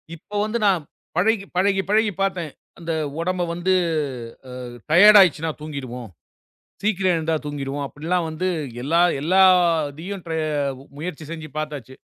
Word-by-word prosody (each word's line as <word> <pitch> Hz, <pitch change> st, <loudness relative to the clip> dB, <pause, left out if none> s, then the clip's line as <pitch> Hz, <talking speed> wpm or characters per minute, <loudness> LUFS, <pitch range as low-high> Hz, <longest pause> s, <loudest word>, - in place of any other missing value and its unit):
இப்ப 205 Hz, +5 st, -5 dB
வந்து 215 Hz, +2 st, -1 dB
நான் 190 Hz, -5 st, +3 dB, 0.4 s
பழகி 200 Hz, +2 st, +2 dB
பழகி 195 Hz, +1 st, +2 dB
பழகிப் 210 Hz, -2 st, +2 dB
பாத்தேன், 185 Hz, -5 st, -1 dB, 0.3 s
அந்த 170 Hz, 0 st, -4 dB, 0.3 s
உடம்பு 180 Hz, +1 st, -1 dB
வந்து 175 Hz, +2 st, 0 dB, 0.8 s
அ, -, -, -9 dB, 0.4 s
டையர்ட் 205 Hz, +5 st, +9 dB
ஆயிடுச்சுன்னா 165 Hz, -3 st, +2 dB
தூங்கிடுவோம், 130 Hz, -6 st, -6 dB, 0.7 s
சீக்கிரம் 190 Hz, -3 st, +2 dB
எழுந்தா 160 Hz, 0 st, 0 dB
தூங்கிடுவோம், 145 Hz, -1 st, -4 dB
அப்படிலாம் 165 Hz, +4 st, -2 dB
வந்து 170 Hz, +4 st, -2 dB, 0.3 s
எல்லா 165 Hz, +6 st, +3 dB, 0.2 s
எல்லாத்தையும் 175 Hz, 0 st, +3 dB
ட்ர 165 Hz, -, -4 dB, 0.7 s
முயற்சி 160 Hz, -1 st, -6 dB
செஞ்சு 160 Hz, -2 st, -7 dB
பாத்தாச்சு. 145 Hz, -5 st, -6 dB
170 Hz, 125 wpm, -22 LUFS, 155-190 Hz, 0.8 s, டையர்ட்